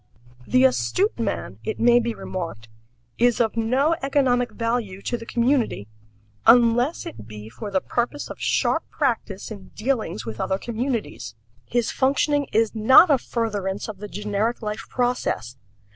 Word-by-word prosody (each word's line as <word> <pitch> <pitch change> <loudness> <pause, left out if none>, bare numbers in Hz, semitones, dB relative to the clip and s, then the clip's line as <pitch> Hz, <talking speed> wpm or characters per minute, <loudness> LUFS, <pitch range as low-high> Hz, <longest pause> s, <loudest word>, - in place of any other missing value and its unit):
The 125 - +4
astute 130 - +1
man, - - -3
it 440 - -4
may 240 +1 +5
be 235 -1 -2
remarked, 165 -12 -6 0.5
is 245 -1 +3
of 225 -2 +1
no 260 +8 +2
economic 260 -3 +2
value 230 -5 -2
to - - -2
the 230 -1 -8
community 235 - 0 0.6
unless 240 +5 +4
it 110 -1 -9
be 105 -1 -9
for 205 - -7
the 190 -2 0
purpose 245 +5 -2
of - - -9
sharp - - +1
practice 230 -8 -2
in 200 -3 -9
dealings 220 - -2
with 110 0 -5
other 190 - 0
communities. 220 - -4 0.3
His 240 -1 0
functioning 285 +1 +1
is 225 0 +2
not 260 +9 +7
a 275 - +4
furtherance 205 -5 -3
of 210 -4 -8
the 210 - -6
generic 210 +3 -2
life 210 0 -4
process. 245 - -1
230 Hz, 150 wpm, -23 LUFS, 195-245 Hz, 0.6 s, not